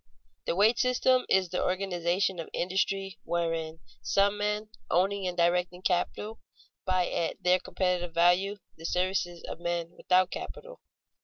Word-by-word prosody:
_The 170 - 0
wage 220 +4 +4
system 250 0 +3
is 190 -2 +3
the 180 - -1
organization 185 0 0
of 165 - -5
industry 195 +1 -1
wherein 165 -1 -2 0.2
some 200 +1 +2
men, 210 +1 -2 0.2
owning 195 +2 +1
and 180 - -4
directing 180 +1 +1
capital, 205 +4 -1 0.5
buy 185 -1 +2
at 165 - -2
their 180 +1 +4
competitive 180 -3 -1
value 180 +4 +3 0.2
the 165 - -11
services 180 -1 -1
of - - -7
men 170 -1 -2
without 185 0 +2
capital. - - -8
185 Hz, 140 wpm, -29 LUFS, 175-195 Hz, 0.5 s, wage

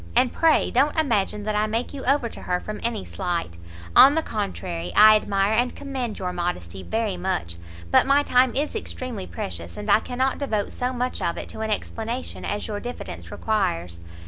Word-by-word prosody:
And 250 - +3
pray 325 -2 +3
don't 295 +3 +2
imagine 210 -7 +1
that 215 0 -1
I 210 +1 +2
make 225 +5 -2
you 275 - -6
over 275 -2 +2
to - - -10
her 180 0 -1
from 215 +2 -6
any 230 -4 -2
slight; 170 - -3 0.4
on 280 +2 +9
the 320 - +1
contrary, 190 -5 -4
I 215 0 +9
admire 200 -1 +1
and 245 +3 +1
commend 260 -6 -4
your 180 -1 -3
modesty 95 - -3
very 220 - -2
much; 175 - -2 0.4
but - - +5
my 280 +1 +4
time 250 -2 +3
is 295 +8 0
extremely 255 - -4
precious, 85 -1 -6
and 205 0 -2
I 210 - +7
cannot 260 +3 -1
devote 220 -8 -1
so 250 +1 -2
much 250 0 -2
of 170 - -1
it - - -6
to - - -8
an 220 0 -2
explanation 225 +4 -3
as 205 - -3
your 210 -2 -3
diffidence 245 +3 -7
requires." 90 - -1
215 Hz, 195 wpm, -24 LUFS, 190-250 Hz, 0.4 s, on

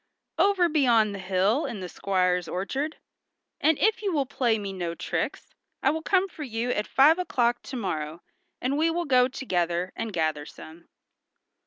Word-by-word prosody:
"Over 390 -3 +4
beyond 240 -9 +3
the 200 - -6
hill 195 - +1
in 235 -6 -5
the 185 - -5
squire's 180 -2 0
orchard, 270 - -3 0.6
and 315 -1 +3
if 435 +1 +2
you 405 -2 -1
will 290 -5 +1
play 245 -4 +1
me 200 -2 -5
no 175 -3 -4
tricks - - -4 0.3
I 270 - +4
will 320 +1 -3
come 380 +3 +2
for 340 - -12
you 240 -3 -2
at 210 -3 -1
five 305 +6 +5
o'clock 240 -9 +1
to 265 - -8
morrow, 160 -7 -4 0.4
and 275 +4 -1
we 325 +1 +3
will 345 +1 -1
go 250 -3 +4
together, 180 -8 -2
and 225 -1 -4
gather 155 -4 -1
some." 165 +2 -13
235 Hz, 175 wpm, -26 LUFS, 185-295 Hz, 0.6 s, five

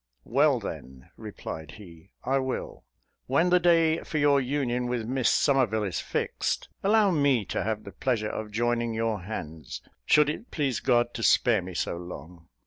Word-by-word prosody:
"Well, 140 +2 +3
then," 65 - -9
replied 80 -1 -8
he, 90 -3 -14
"I 135 +2 +1
will: 130 -1 -4 0.4
when 165 +7 +2
the 180 - +6
day 165 -2 +3
for 155 - -4
your 145 -1 +4
union 125 -2 -1
with 120 -2 -2
Miss 130 +1 +1
Somerville 125 -7 +2
is 95 -5 -2
fixed, - - -2
allow 205 0 +4
me 140 - +2
to - - -1
have 110 +1 -2
the 100 - -9
pleasure 110 -4 -1
of 110 -1 -5
joining 120 +1 -1
your 110 -3 -1
hands, 80 - -7 0.3
should 150 -1 +5
it 155 +11 -4
please 135 -7 -1
God 120 -1 +2
to 115 - -5
spare 115 -2 +4
me 90 0 -8
so 85 - -2
long. 85 -1 -10
120 Hz, 170 wpm, -27 LUFS, 100-140 Hz, 0.4 s, the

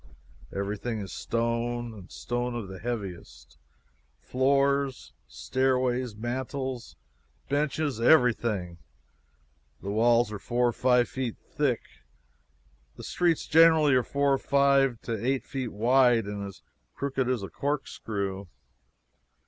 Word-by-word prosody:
Everything 105 +3 -3
is 100 -2 -6
stone, 115 0 -2
and 95 -4 -12
stone 120 0 -3
of 115 -4 -4
the 95 0 -9
heaviest 95 - -6 0.6
floors, 140 0 +1
stairways, 130 -3 0
mantels, 130 +2 -4 0.5
benches 145 -3 -1
everything. 115 - +3 1.0
The 100 - -5
walls 115 +1 +3
are 105 - -5
four 120 +3 +1
to - - -13
five 125 -1 +3
feet 130 -4 -4
thick. 135 -4 -1 1.1
The - - -10
streets 170 -3 +1
generally 160 -3 +6
are 130 - +4
four 140 +2 +1
or 135 - +1
five 140 -3 +3
to 115 -2 -4
eight 130 +1 0
feet 130 -4 -4
wide 120 +1 +3
and 100 0 -5
as 100 - -12 0.3
crooked 135 -2 -1
as 125 -5 -1
a 95 - -5
corkscrew. 100 - -3
120 Hz, 115 wpm, -27 LUFS, 110-135 Hz, 1.1 s, generally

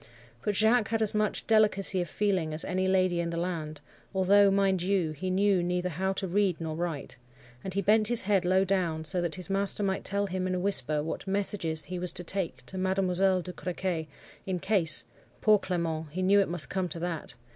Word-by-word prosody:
But 210 -1 -1
Jacques 220 +1 +3
had 225 -1 0
as 215 - +2
much 210 -1 0
delicacy 210 -4 +3
of 175 - -5
feeling 185 -7 -1
as 160 - -2
any 185 0 -1
lady 185 -2 +2
in 170 0 -1
the 170 - -4
land, 160 -4 -4 0.3
although, 200 +2 +5
mind 195 -2 +2
you, 180 -3 0
he 180 +5 -5
knew 195 0 +2
neither 180 +1 -1
how 190 +4 -2
to 190 - -4
read 190 -1 +1
nor 160 -1 -4
write,—and 140 +1 -6
bent 215 +1 +4
his 240 -1 +3
head 195 -1 +2
low 185 +2 +3
down, 175 -5 -1
so 175 +3 0
that 170 -2 -3
his 185 -2 -3
master 200 +1 +1
might 190 -1 -1
tell 200 +1 +1
him 185 -1 -3
in 185 - -1
a - - -1
whisper 155 -6 +1
what 165 +5 -5
messages 190 -5 -1
he 180 0 -5
was 180 0 0
to 175 - -4
take 190 0 -3
to 190 - -5
Mademoiselle 185 0 +1
de 180 - -7
Crequy, 175 -3 -3 0.4
in 185 -1 -1
case—Poor 200 +3 +1
Clement, 165 -4 -3
he 185 +5 -4
knew 200 +2 +4
it 195 - +1
must 175 -2 +1
come 185 -2 -1
to - - -5
that! 165 -2 -5
185 Hz, 205 wpm, -28 LUFS, 170-195 Hz, 0.4 s, although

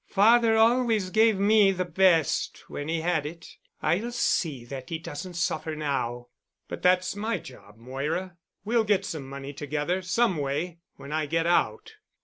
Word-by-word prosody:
Father 225 +2 +5
always 225 -4 +3
gave 220 0 +4
me 205 0 +5
the 185 -1 -2
best 175 -5 +1
when 145 - -6
he 165 0 -1
had 165 -2 0
it. 165 +3 -9 0.3
I'll 220 +8 0
see 155 - 0
that 130 0 -8
he 165 - -2
doesn't 165 +3 -7
suffer 165 -2 -2
now." 125 -5 -3 0.4
"But - - -7
that's 185 +1 +2
my 220 +3 -1
job, 105 -5 -13
Moira. 150 +9 -4 0.3
We'll 230 +1 +2
get 205 -2 +1
some 140 -5 -6
money 140 +1 -7
together—some 180 - 0
way—when 150 +1 -5
I 155 -1 -1
get 165 +2 0
out." 430 - 0
175 Hz, 150 wpm, -27 LUFS, 145-205 Hz, 0.4 s, Father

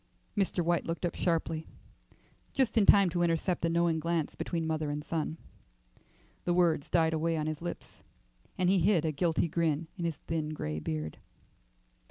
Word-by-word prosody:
Mr. 190 -4 0
White 170 0 +1
looked 165 +2 -2
up 175 - -1
sharply, 165 -2 -1 0.9
just 265 -4 +1
in 215 -3 +4
time 200 -2 +7
to 175 0 0
intercept 170 +1 +1
a - - +2
knowing 170 -1 +2
glance 165 -1 -1
between 165 -2 -3
mother 155 -1 -1
and 150 +1 -3
son. 160 0 -2 1.1
The 175 - +1
words 170 -4 +2
died 160 -1 +3
away 165 +1 0
on 155 - -1
his 155 0 -3
lips, 175 - -7 0.6
and 185 - +2
he 190 +1 +4
hid 175 -2 +3
a 160 - +1
guilty 165 +3 +1
grin 165 -1 0
in 170 - -2
his 165 -4 -2
thin 155 -1 -3
grey 75 - -3
beard. 75 0 -4
165 Hz, 175 wpm, -31 LUFS, 155-175 Hz, 1.1 s, time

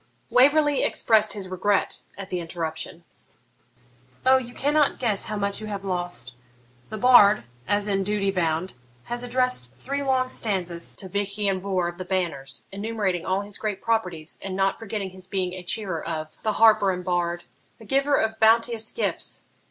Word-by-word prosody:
Waverley 290 +2 +5
expressed 215 -1 +3
his 200 -3 -1
regret 190 +2 0 0.2
at 195 -1 -8
the 180 - -1
interruption. 165 0 -5 1.2
'O 260 0 +7
you 245 -2 -5
cannot 290 +3 +2
guess 220 -6 -1
how 215 - -4
much 200 +1 -2
you 215 - -6
have 200 -2 -5
lost! 175 -10 -4 0.6
The 215 - -5
bard, 215 -3 +6 0.2
as 205 +1 +1
in 195 -1 +1
duty 200 0 0
bound, 170 -1 -1 0.3
has 240 +1 -4
addressed 245 - 0
three 280 +2 -3
long 260 -2 +1
stanzas 180 -8 -2
to 190 - -6
Vich 200 +1 -2
Ian 200 -2 0
Vohr 185 -2 -1
of 175 +1 -7
the 185 - -5
Banners, 165 -8 -3
enumerating 200 -3 -2
all 190 +1 +1
his 205 0 -7
great 210 -3 -2
properties, 180 -9 -2
and 190 -1 -5
not 195 0 +1
forgetting 205 -3 -4
his 185 0 -9
being 185 -2 -2
a 185 - -6
cheerer 185 -2 -3
of 155 -1 -5
the 215 - 0
harper 220 -3 +5
and 180 -1 -2
bard 175 -1 -1 0.4
"a 225 - -13
giver 275 +5 +2
of 220 0 0
bounteous 225 0 +3
gifts." - - -2
200 Hz, 170 wpm, -25 LUFS, 180-225 Hz, 1.2 s, O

